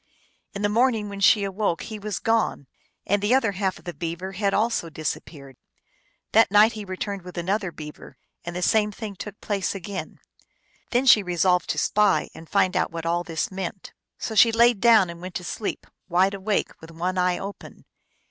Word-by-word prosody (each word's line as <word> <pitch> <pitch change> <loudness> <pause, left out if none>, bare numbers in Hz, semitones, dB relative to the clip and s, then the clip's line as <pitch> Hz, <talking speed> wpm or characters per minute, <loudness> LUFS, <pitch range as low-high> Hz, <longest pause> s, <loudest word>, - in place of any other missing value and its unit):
In 200 - -4
the - - +4
morning 225 -1 +1
when 200 0 -7
she 200 +1 +5
awoke 195 -2 -1
he 220 -2 -7
was 210 -1 -4
gone, 225 -10 0 0.4
and 205 +1 +1
the 210 +5 +3
other 235 -6 +2
half 190 -1 -2
of - - -18
the 175 - -5
beaver 170 +5 -5
had 200 +1 0
also 210 -5 0
disappeared. 145 -3 -6 0.7
That 225 +1 +5
night 210 +3 +6
he 215 -1 -6
returned 195 +1 -5
with 180 0 -11
another 190 +2 -1
beaver, 150 -2 -11 0.3
and 175 0 -6
the 180 - -2
same 210 +1 +3
thing 210 -1 -7
took 210 +2 -8
place 200 -2 -2
again. 195 +1 -6 0.7
Then 250 +2 +1
she 225 -5 +7
resolved 180 0 +1
to - - -1
spy 205 -7 +2
and 160 - -12
find 185 -2 +2
out - - +1
what 165 0 -6
all 170 +1 0
this 165 +1 -3
meant. 190 0 -6 0.2
So 225 - -4
she 225 +2 +6
laid 235 -1 +4
down 225 -5 +6
and 170 0 -11
went 185 0 -8
to 180 - -3
sleep, 205 +4 -4 0.2
wide 185 +3 +3
awake, 200 +1 -1
with 160 - -11
one 180 +3 -2
eye 180 0 +2
open. 200 +1 -9
195 Hz, 195 wpm, -24 LUFS, 175-210 Hz, 0.7 s, she